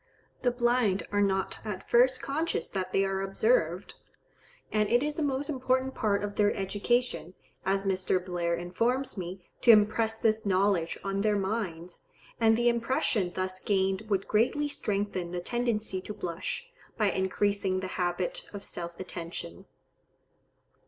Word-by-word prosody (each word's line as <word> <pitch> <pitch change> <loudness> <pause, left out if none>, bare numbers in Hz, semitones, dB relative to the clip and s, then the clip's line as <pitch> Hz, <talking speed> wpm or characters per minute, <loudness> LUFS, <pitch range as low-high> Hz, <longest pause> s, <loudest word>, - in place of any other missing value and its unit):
The 250 - +3
blind 240 -6 +2
are 205 0 +2
not 195 -1 0
at 210 -4 -5
first 255 +2 +4
conscious 315 +4 -1
that 185 -1 -3
they 195 - +3
are 195 0 -1
observed, 445 - +1 0.8
and 210 -1 +2
it 240 +3 +4
is 300 +1 -2
a - - 0
most 280 -1 0
important 260 -2 0
part 205 -2 0
of 205 0 -4
their 205 0 +4
education, 205 -1 -1 0.3
as 195 0 +2
Mr. 185 -1 +1
Blair 175 -2 0
informs 230 +10 -1
me, 185 -1 -6
to 245 - +2
impress 220 +1 +5
this 220 0 +1
knowledge 190 -3 +2
on 195 0 -1
their 210 0 +2
minds; 190 -4 -3 0.4
and 225 -1 +5
the 240 0 +2
impression 235 - +1
thus 185 0 -2
gained 195 +2 0
would 195 -2 0
greatly 245 +7 +2
strengthen 200 -9 -2
the 180 - -1
tendency 220 -1 -1
to 210 - -7
blush, 180 - -4 0.3
by 210 -3 +3
increasing 190 0 0
the 190 - -4 0.2
habit 175 0 -1
of 200 -1 -7
self 170 -3 -5
attention. 170 - -7
205 Hz, 150 wpm, -29 LUFS, 185-235 Hz, 0.8 s, impress